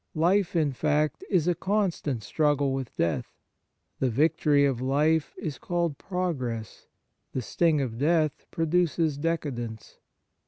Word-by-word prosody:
Life, 180 +4 +2
in 155 -4 +2
fact, 150 +2 0
is 180 -5 +2
a 175 - +4
constant 180 - -1
struggle 145 -1 +1
with 135 -3 -4
death. 85 -2 -1 0.6
The 130 - +2
victory 145 +2 +3
of 130 -3 0
life 150 +4 +1
is 150 -4 -5
called 170 -5 -1
progress, 130 - -3 0.5
the 130 - -1
sting 160 +3 +2
of 120 -3 -4
death 155 0 +1
produces 165 -2 +1
decadence. 130 -9 -3
150 Hz, 125 wpm, -27 LUFS, 135-165 Hz, 0.6 s, a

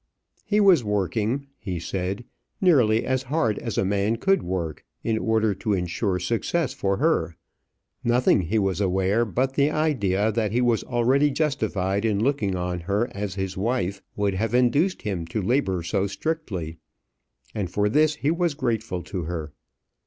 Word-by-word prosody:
"He 210 0 +2
was 190 - +6
working," 105 +6 -1
he 95 -4 -4
said, 95 +6 -3 0.3
"nearly 125 - +4
as 130 0 0
hard 130 -6 0
as 115 -4 -4
a - - +2
man 100 +3 +1
could 195 +11 +2
work, 85 -4 -3 0.2
in 110 -1 0
order 110 -2 +2
to 105 +2 -2
insure 90 +1 -1
success 115 - -1
for 100 0 -1
her. 130 - +1 0.7
Nothing 120 -3 +3
he 90 +6 -1
was 95 -2 0
aware 95 +4 +2
but 130 +5 -1
the 140 +1 +3
idea 110 -10 +1
that 110 -2 0
he 120 - +1
was 120 -2 +2
already 130 +4 +2
justified 110 - -1
in 105 -3 +1
looking 110 -6 +1
on 90 0 -2
her 100 +8 -1
as 100 -4 -4
his 95 -1 -3
wife 100 -2 -1
would 100 -1 0
have 110 +5 -1
induced 140 +10 +2
him 90 -6 -3
to 85 - -3
labour 95 -5 0
so 100 +3 0
strictly; 100 - -4 0.8
and 100 -4 -2
for 105 0 +1
this 150 +7 +3
he 150 0 0
was 170 -2 0
grateful 115 -8 -2
to 90 +1 -4
her. 80 -3 -5
110 Hz, 165 wpm, -24 LUFS, 95-130 Hz, 0.8 s, was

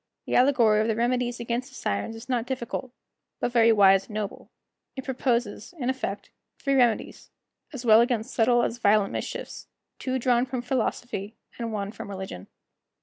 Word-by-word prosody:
The - - -4
allegory 240 -5 +4
of 220 - 0
the 225 - +1
remedies 245 +1 0
against 235 +2 -3
the - - -16
Sirens 100 - -2
is 225 +2 -10
not 245 -2 -1
difficult, 255 -1 -4 0.5
but - - -1
very 230 -1 +5
wise 195 -2 +5
and 210 - -9
noble; 210 -2 -5 0.5
it 265 - -5
proposes, 245 0 -1
in 260 -3 0
effect, 205 -6 -5 0.3
three 275 - -1
remedies, 245 -4 +1 0.4
as 265 -4 -7
well 220 0 +7
against 240 0 -1
subtile 240 +1 +3
as 235 - -2
violent 205 -2 +3
mischiefs, - - -5 0.3
two 260 0 -1
drawn 245 0 +2
from 250 -1 -4
philosophy 240 -4 -2 0.2
and 230 -1 -3
one 200 -2 -3
from 205 - -9
religion. 190 - -7
235 Hz, 170 wpm, -26 LUFS, 215-250 Hz, 0.5 s, well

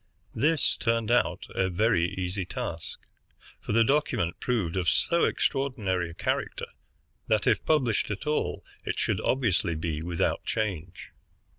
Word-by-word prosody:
This 155 0 +2
turned 115 -1 0
out 120 - +2
a 95 0 +1
very 90 -2 +2
easy 95 +1 -2
task, 85 -2 -5 0.6
for - - -5
the 115 +2 +5
document 120 - +1
proved 105 -9 -1
of 90 -3 +2
so 170 - +3
extraordinary 105 - 0
a 85 - -10
character - - -2 0.6
that, - - +2
if - - +3
published 130 -9 +2
at 105 +6 -4
all, 150 0 -1 0.2
it - - -3
should - - 0
obviously 100 -9 +1
be 80 -1 -2
without 85 0 -1
change. 95 -6 -3
105 Hz, 140 wpm, -28 LUFS, 85-125 Hz, 0.6 s, the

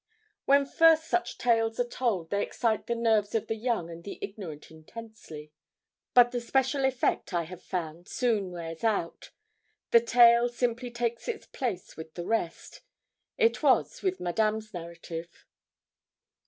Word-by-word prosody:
When 280 0 +5
first 325 +2 +5
such 235 0 -1
tales 225 -1 +1
are 245 - +1
told, 215 -10 -2
they 200 0 +1
excite 225 -3 -1
the 235 - 0
nerves 220 -2 +1
of 225 - 0
the - - -2
young 225 -6 -1
and 170 0 -10
the 200 - -7
ignorant 180 -8 -8
intensely. 160 -3 -11 0.6
But 245 -1 +7
the 245 - -2
special 265 +3 +1
effect, 255 -7 0
I 170 - +1
have 180 +2 -10
found, 170 -1 -5
soon 220 -6 0
wears 165 -1 -7
out. 205 -7 -1 0.6
The 235 - +7
tale 235 0 +6
simply 240 0 -2
takes 235 -1 -3
it's 465 -3 -4
place 220 -9 -5
with 160 0 -9
the 175 - -5
rest. 220 -6 -3 0.6
It 460 -1 +2
was - - +2
with 375 -1 -1
Madame's 215 +4 -1
narrative. 170 -1 -8
225 Hz, 150 wpm, -28 LUFS, 175-240 Hz, 0.6 s, But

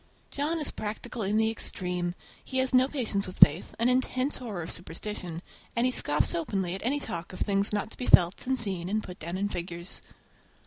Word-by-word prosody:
John 300 +4 -1
is 300 - 0
practical 225 +3 -5
in 205 +1 +1
the 220 0 +3
extreme. 180 -4 -2 0.3
He 260 - -4
has 260 0 +2
no 255 +1 +6
patience 225 -9 -1
with 185 - -9
faith, 155 +5 +6
an 230 - +2
intense 255 +2 +1
horror 210 -9 -5
of 160 - -6
superstition, 175 0 -6 0.3
and 235 +1 +2
he 255 - +3
scoffs 150 -11 +3
openly 175 +1 -1
at 190 - -4
any 275 +5 +1
talk 170 -9 -5
of 185 - -8
things 200 0 +1
not 210 +1 -1
to - - -9
be 250 - -4
felt 175 +6 +5
and 265 0 +2
seen 190 -6 -1
and 215 +1 0
put 180 - -9
down 170 +3 -4
in 200 +1 0
figures. 175 -1 -5
205 Hz, 210 wpm, -28 LUFS, 180-250 Hz, 0.3 s, no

